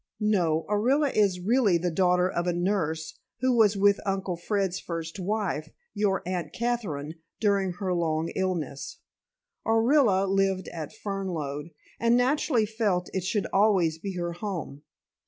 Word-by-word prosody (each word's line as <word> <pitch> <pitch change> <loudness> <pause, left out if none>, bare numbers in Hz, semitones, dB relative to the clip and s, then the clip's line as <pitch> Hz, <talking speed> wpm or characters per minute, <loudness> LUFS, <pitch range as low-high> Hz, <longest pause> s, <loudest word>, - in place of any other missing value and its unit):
"No. 175 -7 +1
Orilla 260 +8 +2
is 200 -4 +3
really 210 -1 +3
the 175 +1 -1
daughter 180 +1 +3
of 175 -1 -2
a 175 - +2
nurse 170 -3 -1 0.2
who 255 -1 +3
was 215 -3 +4
with 200 +1 +4
Uncle 195 -2 -2
Fred's 195 +1 -1
first 165 +1 -5
wife, 190 -5 -2 0.2
your 200 -2 0
Aunt 175 -4 -3
Katherine, 170 -11 -3 0.2
during 200 -3 +1
her 185 0 -2
long 165 -2 0
illness. 170 -7 -3 0.7
Orilla 225 -4 +3
lived 195 -1 +1
at 160 -3 -6
Fernlode, 170 -7 -4 0.3
and 235 +1 +4
naturally 250 -2 +2
felt 205 -5 -1
it 190 - -1
should 200 +2 0
always 190 -6 +3
be 195 +2 -5
her 175 -1 -2
home. 175 -7 -5
190 Hz, 140 wpm, -27 LUFS, 170-210 Hz, 0.7 s, was